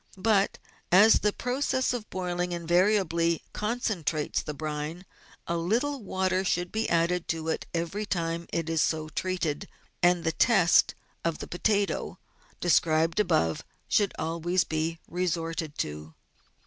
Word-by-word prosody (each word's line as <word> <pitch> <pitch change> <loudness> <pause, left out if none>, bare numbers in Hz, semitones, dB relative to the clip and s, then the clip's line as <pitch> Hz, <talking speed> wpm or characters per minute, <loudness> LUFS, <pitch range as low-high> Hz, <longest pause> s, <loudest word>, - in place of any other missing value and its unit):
But, 200 0 +2 0.3
as 205 +5 +7
the 210 - +2
process 260 +2 0
of 230 -4 -5
boiling 180 -1 -2
invariably 170 -1 +2
concentrates 210 - -1
the 150 - -6
brine, 155 +4 -4 0.4
a 170 - -1
little 240 +11 0
water 190 -1 0
should 175 -1 -1
be 220 +1 -1
added 170 +1 +1
to 160 0 -2
it - - -2
every 170 +5 -3
time 170 -2 -2
it 165 -1 -2
is 165 -1 +1
so 155 -1 0
treated, 165 -3 -2 0.3
and 175 -1 +4
the 160 - +1
test 195 -2 +4 0.3
of 165 -2 0
the - - -6
potato, 200 +3 0 0.4
described 165 0 +2
above, 80 - +1 0.2
should 205 -3 +2
always 170 +3 0
be 160 +1 -2
resorted 165 -3 -2
to. 75 +1 -5
175 Hz, 135 wpm, -28 LUFS, 165-195 Hz, 0.4 s, as